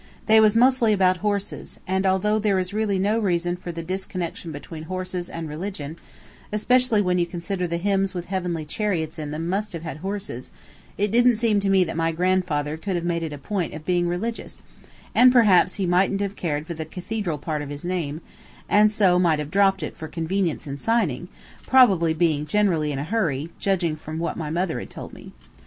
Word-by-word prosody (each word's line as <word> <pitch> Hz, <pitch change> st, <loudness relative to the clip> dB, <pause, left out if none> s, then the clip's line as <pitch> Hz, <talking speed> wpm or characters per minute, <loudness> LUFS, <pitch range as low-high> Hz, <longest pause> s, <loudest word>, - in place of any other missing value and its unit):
They 220 Hz, 0 st, +6 dB
was 215 Hz, 0 st, +5 dB
mostly 245 Hz, -2 st, +4 dB
about 185 Hz, -2 st, +3 dB
horses; 205 Hz, +1 st, -3 dB
and 190 Hz, +1 st, 0 dB
although 210 Hz, +3 st, +2 dB
there 205 Hz, -2 st, +2 dB
is 185 Hz, +1 st, -2 dB
really 210 Hz, -2 st, 0 dB
no 205 Hz, +4 st, +1 dB
reason 175 Hz, -4 st, 0 dB
for 180 Hz, -1 st, -7 dB
the 165 Hz, 0 st, -6 dB
disconnection 180 Hz, -2 st, -4 dB
between 155 Hz, +2 st, -8 dB
horses 185 Hz, 0 st, -4 dB
and 165 Hz, -1 st, -5 dB
religion, 155 Hz, -1 st, -5 dB, 0.6 s
especially 235 Hz, 0 st, +3 dB
when 180 Hz, -1 st, +1 dB
you 170 Hz, -, +1 dB
consider 180 Hz, +1 st, -3 dB
the 170 Hz, 0 st, -2 dB
hymns 195 Hz, +1 st, 0 dB
with 175 Hz, -1 st, -4 dB
heavenly 180 Hz, -4 st, -3 dB
chariots 165 Hz, -3 st, -2 dB
in 150 Hz, -1 st, -4 dB
them 155 Hz, +3 st, -4 dB
must 200 Hz, +3 st, -2 dB
have 165 Hz, -1 st, -6 dB
had 160 Hz, -4 st, -5 dB
horses, 190 Hz, -, -5 dB, 0.5 s
it 205 Hz, 0 st, 0 dB
didn't 240 Hz, +1 st, +5 dB
seem 220 Hz, -2 st, +2 dB
to 195 Hz, 0 st, 0 dB
me 190 Hz, -1 st, +5 dB
that 165 Hz, -, -4 dB
my 165 Hz, 0 st, +1 dB
grandfather 165 Hz, -4 st, 0 dB
could 190 Hz, +3 st, -3 dB
have 170 Hz, 0 st, -2 dB
made 170 Hz, -1 st, 0 dB
it 160 Hz, -2 st, -4 dB
a 145 Hz, -, -6 dB
point 175 Hz, +3 st, -3 dB
of 155 Hz, 0 st, -9 dB
being 175 Hz, -1 st, +1 dB
religious, 215 Hz, +7 st, -4 dB, 0.5 s
and 250 Hz, 0 st, +7 dB
perhaps 210 Hz, -7 st, +5 dB
he 195 Hz, -, -1 dB
mightn't 185 Hz, +3 st, +2 dB
have 200 Hz, 0 st, -2 dB
cared 150 Hz, -3 st, -2 dB
for 170 Hz, -, -5 dB
the 160 Hz, -1 st, -5 dB
cathedral 180 Hz, +1 st, -4 dB
part 150 Hz, +1 st, -3 dB
of 145 Hz, -, -6 dB
his 145 Hz, +3 st, -7 dB
name, 165 Hz, -4 st, -2 dB, 0.5 s
and 210 Hz, +1 st, +5 dB
so 190 Hz, -4 st, +3 dB
might 170 Hz, -4 st, +3 dB
have 150 Hz, 0 st, -5 dB
dropped 195 Hz, 0 st, +3 dB
it -, -, -5 dB
for 160 Hz, -, -7 dB
convenience 165 Hz, +1 st, -2 dB
in 140 Hz, -1 st, -6 dB
signing, 185 Hz, -, 0 dB, 0.4 s
probably 195 Hz, -11 st, +5 dB
being 155 Hz, -2 st, +1 dB
generally 165 Hz, -5 st, +1 dB
in 140 Hz, -, -3 dB
a 140 Hz, -, -2 dB
hurry, 160 Hz, -6 st, -1 dB
judging 175 Hz, -5 st, 0 dB
from 155 Hz, +1 st, -7 dB
what 170 Hz, +1 st, -2 dB
my 155 Hz, -3 st, -4 dB
mother 170 Hz, +1 st, -1 dB
had -, -, -8 dB
told -, -, -9 dB
me. -, -, -11 dB
180 Hz, 205 wpm, -24 LUFS, 160-200 Hz, 0.6 s, and